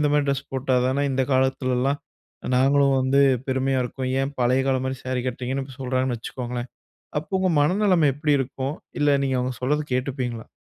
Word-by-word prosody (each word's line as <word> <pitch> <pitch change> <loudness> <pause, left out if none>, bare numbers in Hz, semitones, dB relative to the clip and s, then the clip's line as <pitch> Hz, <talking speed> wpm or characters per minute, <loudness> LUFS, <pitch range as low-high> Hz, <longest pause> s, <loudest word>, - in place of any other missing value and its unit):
இந்த 150 -1 +2
மாரி 145 -1 +2
ட்ரெஸ் 140 -1 -1
போட்டா 130 -1 0
தான 140 +2 +1
இந்த 130 0 +1
காலத்துலல்லாம் 130 +1 +1 0.6
நாங்களும் 135 +1 +4
வந்து 130 +2 +3 0.3
பெருமையா 130 0 +1
இருக்கும். 130 +1 -4
ஏன் 135 +1 -2
பழைய 130 +2 +3
காலம் 130 -1 +1
மாரி 130 -1 -3
சாரி 130 -1 -1
கட்டுறீங்கன்னு 130 +2 -2
இப்போ 135 -1 -12
சொல்கிறாங்கன்னு 130 -2 -1
வச்சுக்கோங்களேன், 125 +1 -5 0.5
அப்போ 190 +4 -3
உங்க 185 - +2
மனநிலைமை 180 -1 +3
எப்படி 150 -1 +2
இருக்கும்? 135 +2 -3 0.3
இல்ல 145 -1 +4
நீங்க 130 -1 0
அவங்க 125 0 -2
சொல்றத 150 +4 +1
கேட்டுப்பீங்களா? 125 -3 -3
130 Hz, 170 wpm, -24 LUFS, 130-140 Hz, 0.6 s, நாங்களும்